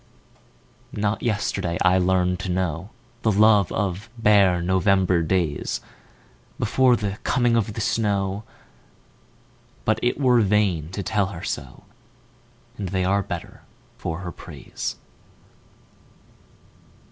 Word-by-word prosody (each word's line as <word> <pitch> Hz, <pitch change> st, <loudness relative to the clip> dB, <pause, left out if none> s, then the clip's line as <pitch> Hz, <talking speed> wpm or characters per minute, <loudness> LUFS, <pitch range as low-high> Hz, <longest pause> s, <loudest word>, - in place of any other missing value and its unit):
Not 105 Hz, 0 st, 0 dB
yesterday 100 Hz, -6 st, -1 dB
I 95 Hz, 0 st, +4 dB
learned 90 Hz, 0 st, +1 dB
to 95 Hz, -, -4 dB
knowThe 100 Hz, -, -3 dB
love 105 Hz, -3 st, +5 dB
of 100 Hz, +1 st, -2 dB
bare 100 Hz, -5 st, +4 dB
November 95 Hz, 0 st, +2 dB
daysBefore 95 Hz, -, -1 dB
the 105 Hz, -1 st, -3 dB
coming 120 Hz, -2 st, +2 dB
of 110 Hz, -2 st, 0 dB
the 110 Hz, -, -3 dB
snow, 100 Hz, -2 st, 0 dB, 1.4 s
But 110 Hz, 0 st, +2 dB
it 120 Hz, -, 0 dB
were 125 Hz, -4 st, +4 dB
vain 100 Hz, -7 st, +1 dB
to 100 Hz, -, -3 dB
tell 105 Hz, -2 st, +1 dB
her 90 Hz, -4 st, -8 dB
so, -, -, -5 dB, 1.0 s
And 100 Hz, -3 st, -3 dB
they 95 Hz, 0 st, 0 dB
are 100 Hz, +2 st, +2 dB
better -, -, -7 dB, 0.4 s
for 85 Hz, -6 st, -4 dB
her 90 Hz, -1 st, -5 dB
praise. -, -, -7 dB
100 Hz, 110 wpm, -23 LUFS, 90-110 Hz, 1.4 s, love